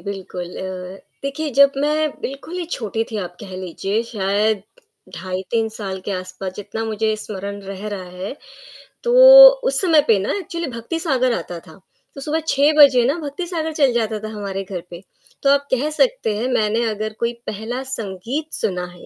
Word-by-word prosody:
बिल्कुल 185 -3 -6
अ, 185 0 -6 0.2
देखिए 280 +2 -3
जब 280 +2 +6
मैं 300 +2 +1
बिल्कुल 275 +5 -6
ही 350 - -2
छोटी 225 -2 -2
थी 220 - -4
आप 175 -3 -6
कह 190 -3 -9
लीजिए, 190 +4 -2
शायद 210 -2 0 0.5
ढाई 185 +1 -4
3 225 -1 +1
साल 195 -3 -5
के - - -4
आस-पास 185 0 -5
जितना 220 +2 -5
मुझे 220 0 0
स्मरण 200 -1 -6
रह 195 +1 -7
रहा 200 -2 -5
है, 185 +9 -6 0.7
तो 480 - +1 0.5
उस - - +1
समय 325 -5 +5
पे 225 - +5
ना 195 - -1
एक्चुअली 340 -3 -4
भक्ति 235 +8 -4
सागर 255 -7 +1
आता 175 -5 -5
था, 165 +3 -16 0.4
तो 275 - -8
सुबह 305 +3 -1
6 285 +2 +4
बजे 270 -5 +7
ना 280 +6 +1
भक्तिसागर 320 +2 -4
चल 280 -5 +3
जाता 220 -2 -1
था 215 - -6
हमारे 195 -2 -4
घर 185 -2 -6
पे, 175 +1 -9 0.4
तो 275 - +4
आप 280 0 +3
कह 265 +4 +1
सकते 485 - +1
हैं 240 +4 -1
मैंने 220 +1 +1
अगर 215 0 -3
कोई 235 0 0
पहला 225 +5 -4
संगीत 230 - -5
सुना 180 -4 -2
है 180 0 -13
220 Hz, 185 wpm, -20 LUFS, 195-280 Hz, 0.7 s, बजे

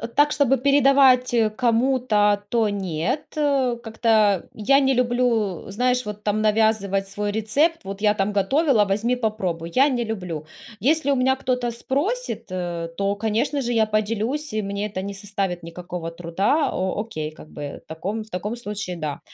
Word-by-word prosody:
так, 295 +1 +4
чтобы 285 -3 +3
передавать 270 -2 +4 0.2
кому-то, 230 -4 +2
то 225 0 +1
нет, 195 - -2
как-то 235 - +1
я 275 +6 +3
не 270 -1 +2
люблю, 240 -6 +1
знаешь, 250 +4 0
вот 210 0 -7
там 210 +1 0
навязывать 210 -3 +1
свой 205 +1 -2
рецепт. 280 +10 +1
Вот: 195 +1 -6
"Я 210 0 +3
там 200 0 -1
готовила, 225 - +3
возьми, 220 +5 0
попробуй". 190 -8 -2
Я 275 +3 +5
не 245 -3 -1
люблю. 180 -8 -5 0.3
Если 285 - +2
у - - +3
меня 260 +1 +3
кто-то 250 -2 -1
спросит, 315 - -2
то, 175 +1 -3
конечно 230 +7 0
же, 240 -1 -1
я 220 -1 +3
поделюсь, 220 +7 -1
и 215 - 0
мне 200 +1 -3
это 190 -2 -5
не 200 +1 -5
составит 195 -3 -3
никакого 170 0 -6
труда. 175 - 0
О 190 +2 -1
окей, 155 -9 -5
как 155 0 -14
бы 145 -1 -7
в - - -45
таком 200 +7 -4
в 215 - -19
таком 205 +5 -4
случае, 210 -5 -5
да. 155 -4 -4
215 Hz, 160 wpm, -23 LUFS, 195-250 Hz, 0.3 s, Я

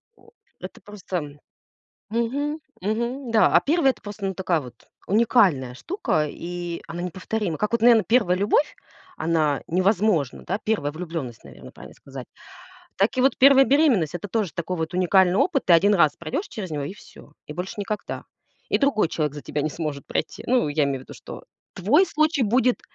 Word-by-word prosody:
о, - - -22 0.3
это - - -10
просто 180 -8 -6 0.7
мгм, 280 +7 -2 0.2
мгм, 235 +5 -2
да, 220 - +5
а - - +6
1- 300 -2 +2
это - - -22
просто, 205 -1 -6
ну, 190 - -2
такая 175 -4 0
вот 125 -3 -11 0.3
уникальная 190 - +3
штука, 335 - -1
и 175 +1 -6
она 175 +1 -5
неповторима. 185 0 -3
Как 210 +2 -1
вот, 235 - +1
наверно, 230 -2 +6
1 215 -7 +2
любовь, 205 +9 +1 0.4
она 155 -4 0
невозможна, 185 - +1
да? 195 - -2
1 175 -10 -1
влюбленность, 155 -8 -6
наверно, - - -13
правильно - - -13
сказать. 135 -2 -10 0.7
Так 205 +6 +1
и - - +3
вот 270 - +3
1 270 0 +7
беременность- 255 - +3
это 190 +4 -5
тоже 210 -6 -1
такой 170 +2 -3
вот 160 +1 -3
уникальный 185 0 +3
опыт. 300 - +1
Ты 175 - +5
1 200 +5 +5
раз 155 -5 +3
пройдешь 335 - -4
через 195 -5 -7
него, 145 -2 -3
и 150 +8 -5
всё. 150 - -16
И 150 - -7
больше 180 +3 -5
никогда. 205 +1 -4 0.5
И - - +3
другой 275 -10 +2
человек 150 -3 -2
за 145 - -8
тебя 150 - -3
не 155 - -1
сможет 150 -3 -5
пройти. - - -4
Ну, 245 -9 +2
я 145 +1 +1
имею 140 -2 -1
в - - -11
виду, - - -12
что - - -10 0.3
твой 265 - +3
случай 310 -3 +1
будет 245 +3 +2
190 Hz, 185 wpm, -24 LUFS, 160-235 Hz, 0.7 s, 1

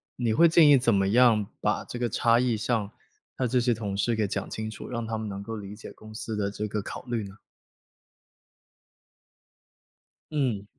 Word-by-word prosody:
你 120 -3 0
会 170 +9 +6
建 160 -1 +6
议 145 - +8
怎 125 -3 +3
么 95 0 +2
样 115 -2 +4 0.2
把 - - 0
这 120 - -7
个 120 -1 0
差 115 +2 +3
异 120 -3 +1
上， 110 -2 -1 0.5
他 130 - 0
这 125 +1 +2
些 120 -1 +2
同 100 -3 -4
事 115 +4 +1
给 110 -2 0
讲 - - -4
清 110 0 -4
楚？ - - -9
让 115 -2 -3
他 110 - -3
们 110 - -4
能 100 0 -6
够 115 +1 -5
理 100 0 -8
解 110 - -10
公 110 0 -14
司 110 0 -4
的 100 -1 -1
这 105 +1 -4
个 105 0 -3
考 - - -7
虑 120 -3 -3
呢？ 95 - -12 3.0
嗯。 125 -10 -1
110 Hz, 210 characters per minute, -27 LUFS, 105-120 Hz, 3.0 s, 议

